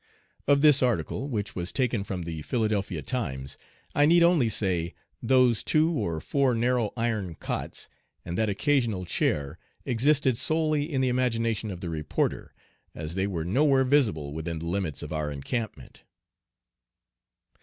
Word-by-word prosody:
Of 140 +1 +4
this 150 -3 +6
article, 125 +2 0
which 105 -5 -3
was 90 +1 -3
taken 120 -6 0
from 95 -3 -4
the 80 -2 -5
Philadelphia 100 - -1
Times, 70 - -3 0.4
I 145 0 +4
need 170 +1 +6
only 170 -9 +4
say, 90 -6 0 0.3
those 130 -3 +3
"two 155 +2 +3
or 85 - -2
four 135 - +1
narrow 120 -2 +1
iron 110 -7 -1
cots" - - -4 0.4
and 85 - -4
that 110 +2 +1
"occasional 115 -3 +1
chair" 70 -4 -1 0.3
existed 130 +1 +2
solely 155 -1 +1
in 135 -2 0
the 130 - +2
imagination 115 -3 0
of 90 -3 -7
the 85 - -4
reporter, 75 -2 -2 0.4
as 80 +1 -4
they 95 +2 0
were 85 -5 -3
nowhere 135 - +3
visible 110 - +1
within 80 +1 -4
the 80 - -6
limits 85 -4 -2
of - - -6
our 75 -1 -1
encampment. 110 - -5
110 Hz, 150 wpm, -27 LUFS, 85-130 Hz, 0.4 s, this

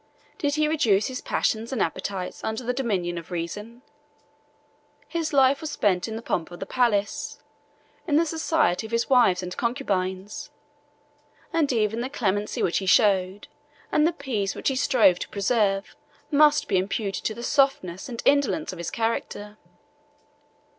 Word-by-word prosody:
Did 290 -2 0
he 305 0 +2
reduce 230 -11 +2
his 255 - -5
passions 225 +2 -1
and 260 - -2
appetites 190 +2 -3
under 220 +3 -3
the 250 +1 -1
dominion 190 -9 -1
of 165 - -13
reason? 205 +8 -6 1.2
His 330 -2 -2
life 275 -1 +4
was 315 - -4
spent 190 -8 +1
in 220 - -5
the 225 - -6
pomp 165 -7 -2
of 175 - -10
the - - -4
palace, 210 -4 0 0.7
in 295 - +2
the 325 +2 +4
society 315 - 0
of - - -16
his 230 +3 0
wives 215 -8 +4
and 180 0 -5
concubines; 200 -6 -2 1.0
and 320 -4 +2
even 225 -1 0
the 255 - -3
clemency 205 -6 -1
which 170 - +1
he 190 - -5
showed, 190 -1 +3 0.4
and 300 +1 +4
the - - +2
peace 250 - -3
which - - 0
he 270 - -1
strove 250 -10 +4
to - - -5
preserve, 200 -1 0 0.4
must 300 0 +4
be 190 - +2
imputed 195 +1 -2
to 220 - -1
the 235 - -7
softness 265 - +1
and 235 -2 -6
indolence 285 +2 +2
of 180 - -9
his 170 - -3
character. 215 -2 -3
225 Hz, 160 wpm, -25 LUFS, 195-270 Hz, 1.2 s, life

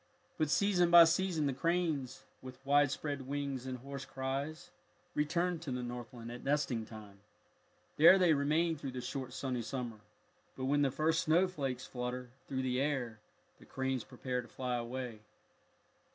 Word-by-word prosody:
But 155 -2 +2
season 180 +2 +3
by 170 0 +10
season 165 -1 +2
the 140 - +1
cranes, 160 -3 -1 0.2
with 130 -1 -9
wide 145 +1 +5
spread 140 -1 -4
wings 140 -2 -3
and 130 -1 -3
hoarse 140 +2 -7
cries, 135 +4 -4 0.4
return 170 +4 0
to 160 -3 -7
the 125 0 -2
Northland 120 -1 -7
at 120 - -8
nesting 140 -6 0
time. 105 -3 -11 0.8
There 170 +5 +9
they 180 -4 +5
remain 155 +3 +1
through 135 -2 -6
the 125 - -4
short 130 +1 -5
sunny 130 -3 -2
summer, 120 -2 -5 0.6
but 130 - -3
when 145 +2 +2
the 140 - +3
first 160 +4 +1
snowflakes 155 -7 +1
flutter 125 0 -5 0.2
through 130 -1 -2
the 130 0 0
air 130 -6 -1 0.4
the - - -15
cranes 130 -2 -2
prepare 125 -1 -3
to 120 - -13
fly 125 +2 -3
away. 120 -1 -4
135 Hz, 160 wpm, -34 LUFS, 125-155 Hz, 0.8 s, by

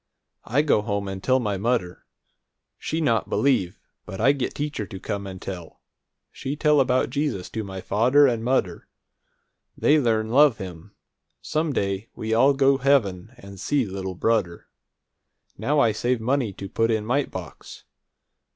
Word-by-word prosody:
I 140 +6 +2
go 140 -8 +3
home 100 -2 -3
and 95 -1 -6
tell 130 0 +3
my 105 -5 -2
mudder. 105 -5 -2 0.7
She 160 - -2
not 115 -7 +1
believe, 125 -11 +1 0.3
but 95 - -7
I 135 - +5
get 135 -3 -3
teacher 145 -8 -3
to 95 - -8
come 100 +1 -4
and 95 -1 -8
tell. 90 -4 -8 0.5
She 135 +2 -5
tell 150 -1 +3
about 130 -1 +2
Jesus 140 -11 -2
to 110 - -3
my 95 -2 -7
fadder 125 +10 +4
and 120 -4 0
mudder. 115 -9 -1 0.9
They 155 +1 +4
learn 110 -4 +1
love 135 0 +5
him. 95 0 -9 0.4
Some 155 0 -1
day 100 -3 -2
we 110 0 -3
all 135 +5 +4
go 135 0 +3
heaven 120 -6 +1
and 100 -5 -12
see 140 +5 0
little 95 -1 -5
brudder! 95 -4 0 0.9
Now 150 +1 0
I 115 -5 +4
save 120 +3 -1
money 125 -1 0
to 100 - -7
put 115 +4 0
in 110 -2 0
mite 130 +4 0
box. 90 -4 -9
115 Hz, 160 wpm, -24 LUFS, 100-135 Hz, 0.9 s, I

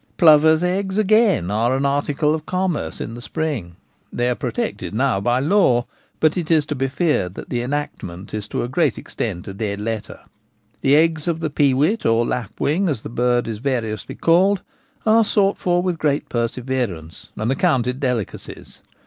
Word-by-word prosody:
Plovers' 160 0 +6
eggs, 190 +2 -1
again, 215 - +3
are 115 +5 +1
an 140 - -1
article 145 +2 +1
of 155 -1 -4
commerce 180 - -2
in 115 - -5
the 120 - -8
spring; 130 - -3 0.4
they 120 +1 0
are - - +2
protected 225 - -4
now 125 -4 +1
by 120 +4 +1
law, 140 -6 +3 0.3
but 155 -1 +3
it 170 -3 -3
is 155 -3 +3
to 150 - -3
be 135 -1 -1
feared 135 - 0
that - - -8
the 120 - -1
enactment 120 -9 -5
is 105 -1 -4
to - - -2
a - - -2
great 140 0 +1
extent 95 -6 -5
a 95 - -5
dead 100 0 -3
letter. 110 0 -5 0.6
The 135 +1 +4
eggs 160 0 +2
of 165 -1 0
the 155 -2 -2
peewit, 145 - +2
or 115 +1 +2
lapwing, 145 - -1
as 135 -8 -3
the - - -6
bird 120 +1 +1
is 110 -2 -4
variously 115 -5 -3
called, 185 +4 +3 0.4
are 225 +1 +5
sought 205 -2 +2
for 175 0 +1
with 180 -3 -1
great 145 -2 0
perseverance, 115 -8 -3
and 110 +4 -1
accounted 135 -6 +1
delicacies. 125 - -4
140 Hz, 175 wpm, -21 LUFS, 115-165 Hz, 0.6 s, Plovers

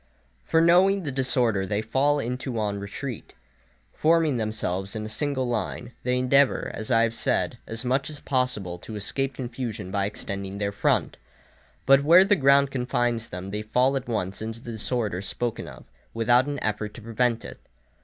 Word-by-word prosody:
For 160 - +3
knowing 185 +3 +4
the 145 - -1
disorder 125 -6 +1
they 105 +2 -1
fall 135 +6 +2
into 125 -1 -3
on 105 -2 -1
retreat, 110 +5 -7 0.6
forming 160 -4 +2
themselves 105 -3 -3
in 110 0 -4
a - - -6
single 130 +3 -1
line, 120 +1 -3
they 125 0 0
endeavour, 135 +2 +3
as 110 - -6
I 115 -2 +4
have 115 -1 0
said, - - 0
as 115 +3 -5
much 135 +3 0
as 150 -1 -7
possible 125 -11 -1
to 110 - -9
escape 135 +6 -2
confusion 120 -6 -5
by 100 0 0
extending 100 -1 -5
their 100 0 -1
front. 100 - +1 0.7
But 135 +1 +6
where 170 +5 +8
the 205 +1 +3
ground 140 -3 +4
confines 120 -3 -1
them 90 +2 -6
they 105 +1 -3
fall 125 +5 +2
at 135 -2 -3
once 100 -4 -3
into 110 +1 -5
the 120 - -8
disorder 110 -4 -2
spoken 115 +4 -3
of, - - -11 0.3
without 120 +3 +3
an 145 0 -3
effort 105 0 -2
to 120 - -10
prevent 115 +1 0
it. - - -9
120 Hz, 175 wpm, -25 LUFS, 105-135 Hz, 0.7 s, where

